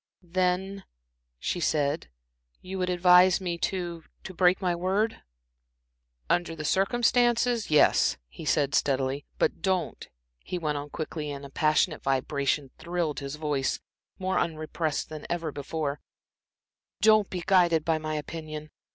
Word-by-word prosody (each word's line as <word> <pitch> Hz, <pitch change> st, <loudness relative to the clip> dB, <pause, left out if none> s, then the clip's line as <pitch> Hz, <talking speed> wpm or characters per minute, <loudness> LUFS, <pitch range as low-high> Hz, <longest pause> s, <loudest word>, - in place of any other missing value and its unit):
"Then," 185 Hz, +2 st, -1 dB, 0.5 s
she 175 Hz, -, -2 dB
said, 150 Hz, -2 st, 0 dB, 0.5 s
"you 190 Hz, +1 st, -6 dB
would 180 Hz, 0 st, 0 dB
advise 180 Hz, 0 st, +6 dB
me 175 Hz, -3 st, -3 dB
to 175 Hz, -3 st, -3 dB, 0.2 s
to 190 Hz, -, -7 dB
break 180 Hz, +1 st, +3 dB
my 180 Hz, -2 st, 0 dB
word?" 195 Hz, +6 st, 0 dB, 1.1 s
"Under 175 Hz, -1 st, 0 dB
the 155 Hz, -1 st, -6 dB
circumstances 240 Hz, +4 st, +2 dB
yes," 150 Hz, -1 st, +4 dB
he 60 Hz, -, -11 dB
said, 140 Hz, -2 st, +1 dB
steadily. 135 Hz, 0 st, 0 dB
"But -, -, 0 dB
don't," 190 Hz, -2 st, -1 dB, 0.3 s
he 180 Hz, -, -5 dB
went 150 Hz, -4 st, -1 dB
on 145 Hz, +1 st, -7 dB
quickly, 155 Hz, 0 st, -5 dB
and 140 Hz, -1 st, -7 dB
passionate 155 Hz, -1 st, +2 dB
vibration 135 Hz, +1 st, 0 dB
thrilled 170 Hz, -2 st, -2 dB
his 140 Hz, 0 st, -5 dB
voice, 145 Hz, -4 st, -1 dB, 0.4 s
more 190 Hz, 0 st, 0 dB
unrepressed 155 Hz, -2 st, -2 dB
than 155 Hz, -1 st, -8 dB
ever 165 Hz, -3 st, -2 dB
before, 145 Hz, 0 st, -3 dB, 1.0 s
"don't 215 Hz, -2 st, +5 dB
be 180 Hz, -2 st, -4 dB
guided 170 Hz, -4 st, +4 dB
by 160 Hz, -1 st, +1 dB
my 155 Hz, 0 st, -3 dB
opinion. 155 Hz, 0 st, -6 dB
165 Hz, 135 wpm, -27 LUFS, 150-185 Hz, 1.1 s, advise